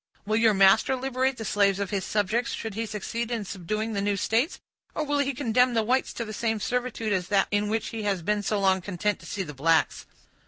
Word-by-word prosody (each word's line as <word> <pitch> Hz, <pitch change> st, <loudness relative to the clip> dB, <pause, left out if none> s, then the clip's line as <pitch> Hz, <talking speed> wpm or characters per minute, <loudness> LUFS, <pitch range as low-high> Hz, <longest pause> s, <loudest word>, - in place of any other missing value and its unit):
Will 215 Hz, +1 st, +1 dB
your 225 Hz, -2 st, +4 dB
master 195 Hz, +7 st, +5 dB
liberate 260 Hz, 0 st, -1 dB
the 225 Hz, -, -5 dB
slaves 200 Hz, -1 st, +2 dB
of 200 Hz, 0 st, -3 dB
his 195 Hz, -2 st, -1 dB
subjects 215 Hz, +5 st, 0 dB
should 225 Hz, -2 st, -5 dB
he 225 Hz, +2 st, -3 dB
succeed 225 Hz, +3 st, -4 dB
in 230 Hz, -4 st, -2 dB
subduing 210 Hz, +4 st, -3 dB
the 200 Hz, -, -1 dB
new 200 Hz, 0 st, 0 dB
states, 230 Hz, -, 0 dB, 0.4 s
or 310 Hz, -, -1 dB
will 290 Hz, -1 st, 0 dB
he 280 Hz, -1 st, +1 dB
condemn 250 Hz, -1 st, +2 dB
the 225 Hz, -, +2 dB
whites 255 Hz, +4 st, +1 dB
to 235 Hz, -, -4 dB
the 215 Hz, -, -7 dB
same 225 Hz, 0 st, -1 dB
servitude 245 Hz, -2 st, -2 dB
as 180 Hz, -2 st, -1 dB
that 195 Hz, -1 st, +2 dB
in 205 Hz, 0 st, +1 dB
which 220 Hz, 0 st, -1 dB
he 225 Hz, -, -5 dB
has 200 Hz, -4 st, -1 dB
been 210 Hz, +3 st, 0 dB
so 205 Hz, +1 st, -1 dB
long 190 Hz, -1 st, +2 dB
content 200 Hz, +2 st, -2 dB
to -, -, -13 dB
see 195 Hz, -, -3 dB
the 150 Hz, -4 st, -8 dB
blacks? 160 Hz, +4 st, +1 dB
215 Hz, 235 wpm, -26 LUFS, 200-235 Hz, 0.4 s, master